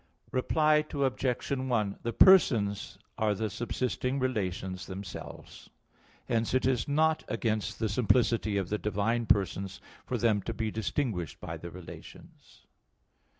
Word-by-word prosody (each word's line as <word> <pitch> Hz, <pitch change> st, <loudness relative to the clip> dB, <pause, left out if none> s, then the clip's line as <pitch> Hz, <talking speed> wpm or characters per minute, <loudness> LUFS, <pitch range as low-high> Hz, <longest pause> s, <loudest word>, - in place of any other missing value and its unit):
Reply 150 Hz, +4 st, +3 dB
Obj. 135 Hz, -3 st, -1 dB
1: 120 Hz, -7 st, 0 dB
The 115 Hz, -, -2 dB
persons 115 Hz, -, +5 dB, 0.2 s
are 105 Hz, -1 st, +2 dB
the 110 Hz, +1 st, -2 dB
subsisting 125 Hz, +3 st, -2 dB
relations 95 Hz, -7 st, -2 dB
themselves. 95 Hz, -1 st, -9 dB, 0.6 s
Hence 115 Hz, +1 st, 0 dB
it 130 Hz, -, +2 dB
is 130 Hz, -3 st, +1 dB
not 155 Hz, +2 st, +2 dB
against 110 Hz, -2 st, -1 dB
the 110 Hz, -, 0 dB
simplicity 110 Hz, -1 st, +2 dB
of 95 Hz, -3 st, -2 dB
the 105 Hz, -, -1 dB
divine 110 Hz, +3 st, 0 dB
persons 95 Hz, 0 st, +1 dB, 0.3 s
for -, -, -1 dB
them 110 Hz, -4 st, +2 dB
to 115 Hz, -, -5 dB
be 110 Hz, -1 st, -2 dB
distinguished 110 Hz, -, -2 dB
by 80 Hz, -, -6 dB
the 85 Hz, +2 st, -8 dB
relations. 90 Hz, 0 st, -13 dB
110 Hz, 130 wpm, -30 LUFS, 100-130 Hz, 0.6 s, persons